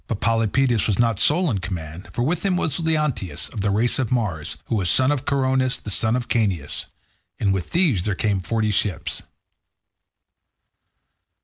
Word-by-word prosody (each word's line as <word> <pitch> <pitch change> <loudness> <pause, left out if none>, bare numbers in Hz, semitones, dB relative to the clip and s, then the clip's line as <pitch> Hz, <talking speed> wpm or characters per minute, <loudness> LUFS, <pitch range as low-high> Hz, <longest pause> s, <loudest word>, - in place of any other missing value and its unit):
But 115 - -3
Polypoetes 115 +1 +2
was 105 -4 +1
not 115 -4 +2
sole 155 - +4
in 100 - -1
command, 85 -1 -6
for 120 - -1
with 160 +6 -1
him 190 -2 +1
was 155 -4 -1
Leonteus, 150 - -1
of 110 - -5
the 105 - +1
race 110 +6 +1
of 125 -4 -1
Mars, 100 -12 -1
who - - -4
was 95 -6 +1
son 130 - +5
of 145 -3 -2
Coronus, 130 -2 +1
the 105 - -6
son 110 +4 +1
of 125 -1 -2
Caeneus. 100 - -1 0.5
And 100 -2 +2
with 95 -3 -3
these 165 - +2
there 100 -1 -1
came 100 0 0
forty 110 +2 0
ships. 105 -1 -2
115 Hz, 175 wpm, -22 LUFS, 100-130 Hz, 0.5 s, son